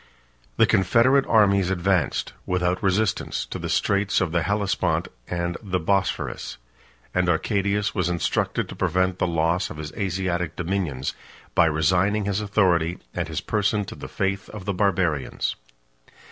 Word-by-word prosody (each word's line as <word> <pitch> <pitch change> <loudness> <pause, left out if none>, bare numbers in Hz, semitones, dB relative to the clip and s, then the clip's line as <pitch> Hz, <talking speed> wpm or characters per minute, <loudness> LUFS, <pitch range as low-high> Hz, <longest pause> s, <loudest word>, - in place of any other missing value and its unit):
The - - +6
confederate 120 +8 +3
armies 100 -4 +4
advanced, 95 -2 0
without 90 0 0
resistance, 100 +1 0
to - - -6
the - - -4
straits 100 0 +2
of 90 -4 0
the 85 0 +1
Hellespont 90 -3 0 0.2
and 85 0 -2
the 95 -4 -1
Bosphorus; 95 +3 -1 0.6
and 90 -1 +2
Arcadius 100 +4 +1
was 90 -3 0
instructed 85 -2 0
to - - -7
prevent 95 +1 0
the - - +2
loss 85 +2 +1
of - - -8
his 75 -1 -6
Asiatic 90 -4 -2
dominions, 85 -7 -2 0.4
by 85 - +5
resigning 90 +7 +2
his 100 +1 0
authority 90 -5 +2 0.2
and - - -2
his - - -3
person 105 -1 0
to - - -8
the - - -9
faith 95 +1 -2
of 105 -4 -8
the 100 - -1
Barbarians. 90 -7 0
95 Hz, 145 wpm, -24 LUFS, 85-100 Hz, 0.6 s, The